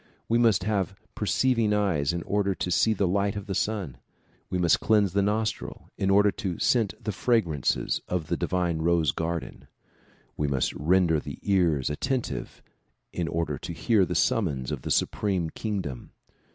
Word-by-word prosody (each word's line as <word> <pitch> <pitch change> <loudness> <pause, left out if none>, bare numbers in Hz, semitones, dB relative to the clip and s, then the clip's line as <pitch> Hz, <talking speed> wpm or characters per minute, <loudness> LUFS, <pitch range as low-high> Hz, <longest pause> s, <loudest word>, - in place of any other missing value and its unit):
We 115 +1 +2
must 110 -6 +3
have 100 -1 -1 0.2
perceiving 115 0 +1
eyes 90 -9 +1
in 85 0 -3
order 100 -1 0
to 90 - -3
see 110 +5 +3
the 100 -1 +1
light 100 +2 0
of 100 -2 -5
the 100 - -4
sun. 95 - -2 0.5
We 90 - -1
must 85 -2 +3
cleanse 105 -4 +2
the 100 - +2
nostril 105 +2 -2
in 95 - -1
order 100 +1 +5
to 95 -6 -4
scent 115 -5 +1
the 105 - -3
fragrances 95 - 0
of 90 -3 -2
the - - -1
divine 90 -3 -1
rose 85 -3 +2
garden. 85 0 -4 0.7
We 75 - -1
must 70 -2 0
render 85 0 +2
the - - -7
ears 85 -9 +2
attentive 120 - -3 0.5
in 85 -2 -2
order 80 -4 -2
to 85 - -6
hear 100 +5 +2
the 90 -1 -2
summons 75 - +1
of - - -4
the - - -6
supreme 95 -6 0
king 105 -3 -3
dom. 65 -8 -7
95 Hz, 170 wpm, -27 LUFS, 80-105 Hz, 0.7 s, order